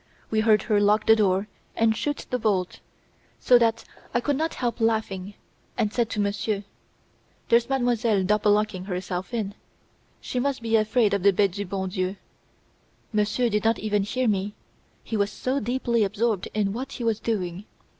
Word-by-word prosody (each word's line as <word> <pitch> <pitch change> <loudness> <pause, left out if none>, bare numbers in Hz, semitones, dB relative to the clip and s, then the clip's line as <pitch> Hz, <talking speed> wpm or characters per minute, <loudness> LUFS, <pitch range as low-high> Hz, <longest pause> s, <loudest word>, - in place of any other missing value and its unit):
We 220 - +2
heard 215 -2 +4
her 210 -3 +2
lock 210 +1 +3
the 220 - +7
door 200 -1 +1 0.3
and 225 -1 +3
shoot 290 +6 -3
the 250 - 0
bolt, 195 -5 0 0.6
so 245 -1 +5
that 230 -1 +1 0.3
I - - +4
could 285 +4 0
not 320 +3 -1
help 240 -1 -2
laughing, 205 -3 -1 0.4
and 210 0 0
said 235 -2 +1
to 215 - -3
Monsieur: 205 0 -1 0.9
"There's 235 +1 +4
Mademoiselle 240 -6 +1
double 210 +2 +3
locking 210 -3 0
herself 185 0 -4
in, 215 -4 -2 0.7
she 250 - -3
must 265 -2 -1
be 225 0 +1
afraid 215 0 +3
of 200 - +1
the 200 +2 +5
'Bete 195 0 +2
du 200 +3 -4
bon 190 0 -3
Dieu!'" 185 0 -2 1.0
Monsieur 215 +4 +1
did 210 -2 0
not 225 0 +3
even 210 -1 0
hear 250 +5 -1
me, 205 0 0 0.5
he 225 - -4
was 200 -1 +1
so 260 +2 -1
deeply 240 -1 0
absorbed 210 0 0
in 200 -2 +1
what 260 +4 -5
he 245 - -5
was 225 -2 +1
doing. 190 -4 -3
215 Hz, 175 wpm, -25 LUFS, 200-235 Hz, 1.0 s, the